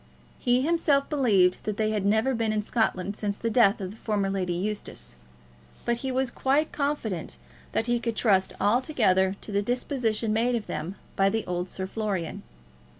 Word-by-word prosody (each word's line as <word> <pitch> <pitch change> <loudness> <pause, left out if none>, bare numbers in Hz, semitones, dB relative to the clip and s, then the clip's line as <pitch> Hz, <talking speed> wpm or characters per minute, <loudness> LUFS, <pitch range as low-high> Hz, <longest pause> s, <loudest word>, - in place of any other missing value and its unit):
He 245 +1 +2
himself 300 -3 +2
believed 205 -11 +3
that 210 -1 -2
they 215 0 +1
had 205 -2 0
never 220 +6 +3
been 225 -2 0
in 215 -1 0
Scotland 205 -4 0
since 205 -1 -2
the 230 - -2
death 220 -1 +4
of 190 -2 -4
the 215 - -12
former 205 -3 -1
Lady 185 -2 -1
Eustace; 205 +4 -3 0.7
but 235 0 +1
he 265 +2 -3
was 260 -1 0
quite 285 +6 +1
confident 235 - -2 0.4
that 225 - +1
he 240 0 +1
could 230 -1 -2
trust 195 -5 +3
altogether 205 -6 +2
to - - -8
the 200 0 +1
disposition 235 -2 -1
made 240 +3 +2
of 225 -3 -3
them 160 +5 -4 0.2
by 195 0 +4
the 220 +2 -1
old 180 0 -3
Sir 190 - -4
Florian. 190 -5 -3
215 Hz, 180 wpm, -27 LUFS, 195-245 Hz, 0.7 s, death